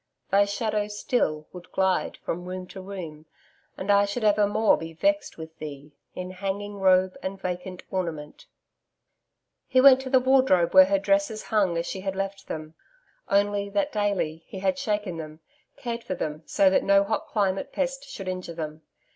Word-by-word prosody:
'THY 200 +1 +5
SHADOW 210 0 -1
STILL 205 -7 -1
WOULD 180 -1 -11
GLIDE 190 -1 +1
FROM 175 +2 -3
ROOM 185 0 -5
TO 190 +1 -10
ROOM 170 -6 -8 0.5
AND 195 +2 0
I 200 0 +5
SHOULD 205 +4 -4
EVERMORE 210 +1 +4
BE 165 0 -7
VEXT 300 - 0
WITH 160 0 -9
THEE 150 -1 -8 0.2
IN 180 0 -5
HANGING 200 +2 -4
ROBE 185 -1 +4
AND 190 +1 -5
VACANT 180 0 -5
ORNAMENT.' 165 -5 -4 1.2
He 255 - +3
went 265 0 +8
to 265 - -6
the 260 -1 +5
wardrobe 255 -9 +3
where 190 0 +9
her 195 +1 +2
dresses 200 +2 +1
hung 195 -6 +1
as 170 - -1
she 190 - -5
had 195 0 -3
left 195 0 -4
them, 155 0 -6 0.6
only 200 0 +1
that 200 0 0
daily, 200 -7 -1
he - - -8
had 190 +6 0
shaken 210 -8 -2
them, 155 -1 -8 0.4
cared 235 -1 -4
for 185 - -3
them 155 -2 -4
so 195 -1 +4
that - - +3
no 200 0 +5
hot 220 +2 -2
climate 195 -3 -1
pest 270 0 -3
should 195 - -7
injure 185 -2 -4
them. 155 -1 -6
195 Hz, 175 wpm, -26 LUFS, 180-205 Hz, 1.2 s, where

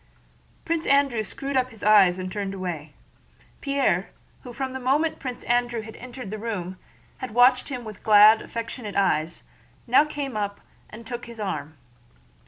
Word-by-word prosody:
Prince 330 0 -1
Andrew 275 -5 +3
screwed 275 +7 -5
up 255 -1 +2
his 225 -4 -13
eyes 200 -4 +6
and 185 0 -5
turned 200 -1 -3
away. 165 -6 -5 0.7
Pierre, 275 - +1 0.3
who 250 - -9
from 260 +1 -4
the 265 - -4
moment 285 +6 +1
Prince 255 -2 -6
Andrew 240 -1 0
entered 250 -4 -9
the 215 - -5
room 190 -5 -4 0.4
had 250 -4 -6
watched 250 +2 +5
him 250 -3 -5
with 215 -3 -9
glad, 215 +1 +7
affectionate 230 -2 -6
eyes, 165 -4 +1 0.4
now 250 +4 +5
came 285 -4 -5
up 205 -1 -3 0.3
and 225 +2 -11
took 240 +1 -6
his 235 -1 -11
arm. 155 -7 -4
230 Hz, 160 wpm, -25 LUFS, 200-255 Hz, 0.7 s, glad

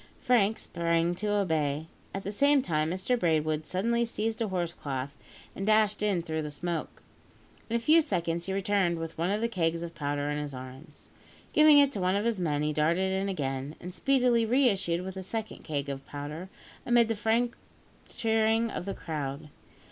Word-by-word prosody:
Frank 220 -3 +3
sprang 170 0 0
to 210 +4 -4
obey. 160 -7 0 0.3
At 195 - -5
the 200 - -3
same 280 +5 +4
time, 155 -4 0
Mr 190 +8 0
Braidwood 155 -3 +1
suddenly 235 +6 +1
seized 225 0 -2
a 225 - +1
horse 175 -3 -2
cloth, 140 -2 -5 0.4
and 195 - -4
dashed 215 0 +3
in 200 -5 +1
through 160 -1 -2
the 150 - -4
smoke. 165 +3 -4 0.7
In 230 - -1
a - - +2
few 310 +8 +5
seconds, 170 - -1
he - - -2
returned 195 -3 +1
with 165 0 -5
one 170 +3 -1
of 205 +2 0
the 230 - +2
kegs 170 -6 -1
of 170 0 -6
powder 145 0 -2
in 145 - -2
his 145 -2 -5
arms. 130 +5 -11 0.4
Giving 305 -1 +7
it 285 -1 +6
to 210 - -4
one 185 +1 +2
of 205 +2 0
his 230 -4 0
men, 150 -4 0
he 150 0 0
darted 170 +5 +1
in 195 +1 -1
again, 140 -4 -3
and 180 +1 -7
speedily 250 0 +3
re 250 +3 +4
issued 175 -4 -1
with 190 - -5
the 190 - -6
second 220 +3 -5
keg 145 -3 -3
of 135 -1 -5
powder, 150 +5 -6 0.3
amid 240 -1 +4
the 225 - 0
frantic 230 +2 +1 0.5
cheering 225 0 +1
of - - -4
the 200 - -4
crowd. 150 -2 -5
185 Hz, 195 wpm, -29 LUFS, 155-220 Hz, 0.7 s, Giving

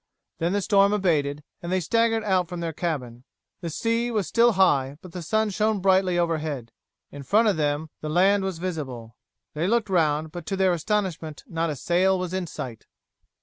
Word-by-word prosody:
Then 170 +3 0
the 205 -1 0
storm 200 0 +4
abated, 150 -7 0 0.2
and 175 - -5
they 185 - +2
staggered 225 +4 +1
out 185 -4 +1
from 175 - -5
their 165 -1 -3
cabin. 130 -8 -4 0.4
The 170 - -4
sea 230 +8 0
was 215 -5 0
still 235 0 +4
high, 145 -8 +2
but 185 - -10
the 180 0 -6
sun 215 +6 0
shone 215 +1 +1
brightly 185 -1 +3
overhead. 155 -8 -1 0.4
In 145 - -8
front 215 - +3
of 210 - +3
them 150 0 -1
the 155 - -5
land 190 +5 +3
was 190 -3 -3
visible. 135 -10 -5 0.4
They 155 +4 -1
looked 225 -1 +1
round, 155 -3 +1
but 175 -2 -8
to 195 - -1
their 190 -1 +3
astonishment 175 -4 -2
not 165 -7 -2
a 150 - -2
sail 185 +6 +2
was 180 -1 -4
in 185 -2 -2
sight. 120 -7 -7
175 Hz, 190 wpm, -25 LUFS, 155-195 Hz, 0.4 s, storm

